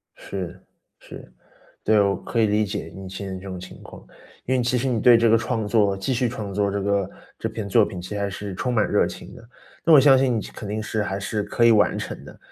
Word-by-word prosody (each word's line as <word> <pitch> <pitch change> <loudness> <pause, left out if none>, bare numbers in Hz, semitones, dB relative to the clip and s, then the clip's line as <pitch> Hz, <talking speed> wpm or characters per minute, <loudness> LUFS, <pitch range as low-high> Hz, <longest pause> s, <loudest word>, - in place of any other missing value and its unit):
是， 95 -3 -7 0.4
是。 - - -12 0.5
对， 110 - +4
我 100 -1 +2
可 120 - -4
以 110 - +4
理 105 +1 +2
解 80 -4 -5
你 95 0 -8
现 100 +1 -7
在 95 - -5
这 95 - -8
种 95 -1 -6
情 90 +1 -11
况。 - - -13 0.4
因 130 - 0
为 125 - +2
其 125 +1 0
实 125 +2 -1
你 120 -3 0
对 120 +1 +7
这 115 0 +3
个 115 +1 +5
创 115 -2 -2
作， 105 -2 +2
继 95 +7 -2
续 125 0 +1
创 105 -4 -6
作 100 0 0
这 100 0 -2
个 100 -1 0 0.3
这 - - -3
篇 105 -3 -6
作 110 +2 +4
品 90 -3 -7
其 95 +4 -6
实 100 -1 -2
是 100 0 -6
充 125 +6 -2
满 110 -3 +2
热 - - +3
情 - - -9
的。 115 - -15 0.4
那 165 - +5
我 150 - +9
相 135 -1 +6
信 130 -3 +2
你 - - 0
其 - - -9
肯 105 - -8
定 110 +1 -3
是 105 +1 -2
还 95 -1 -3
是 105 +2 -2
可 120 - 0
以 115 - +7
完 105 -2 +3
成 - - -6
的。 - - -13
105 Hz, 285 characters per minute, -23 LUFS, 100-115 Hz, 0.5 s, 我